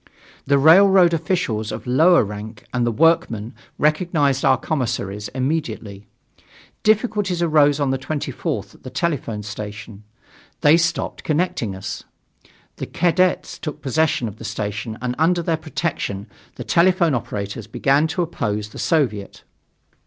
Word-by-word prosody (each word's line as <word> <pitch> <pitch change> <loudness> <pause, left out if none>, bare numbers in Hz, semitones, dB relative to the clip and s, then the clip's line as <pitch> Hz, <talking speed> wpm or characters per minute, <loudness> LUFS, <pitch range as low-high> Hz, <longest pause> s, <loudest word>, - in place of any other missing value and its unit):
The 140 0 +4
railroad 180 +4 +6
officials 155 - -1
of - - -6
lower 160 +7 +5
rank 105 +1 -8
and 120 -1 +1
the - - +1
workmen 115 -6 +1 0.2
recognized 150 -3 +1
our - - +4
commissaries 105 - -3
immediately. 125 -7 -3 0.7
Difficulties 210 -5 +1
arose 150 -3 +4
on 140 -2 +1
the 135 - -1
24th 145 +2 -4
at - - -20
the - - -8
telephone 130 -7 -2
station. 105 0 -8 0.6
They 150 +2 +6
stopped 170 0 -1
connecting 150 - -1
us. 100 +2 -6 0.8
The - - -5
cadets 180 +1 +1
took 150 -1 -6
possession 145 -3 +1
of 105 0 -8
the - - -10
station 105 0 -4
and 125 -1 -1
under 170 +2 +2
their 165 0 +1
protection 155 - -3 0.3
the - - -6
telephone 170 -2 +3
operators 105 -2 -4
began 140 +7 +2
to 175 +2 -1
oppose 105 -10 -3
the - - -11
Soviet. 120 - -1
140 Hz, 135 wpm, -21 LUFS, 110-165 Hz, 0.8 s, railroad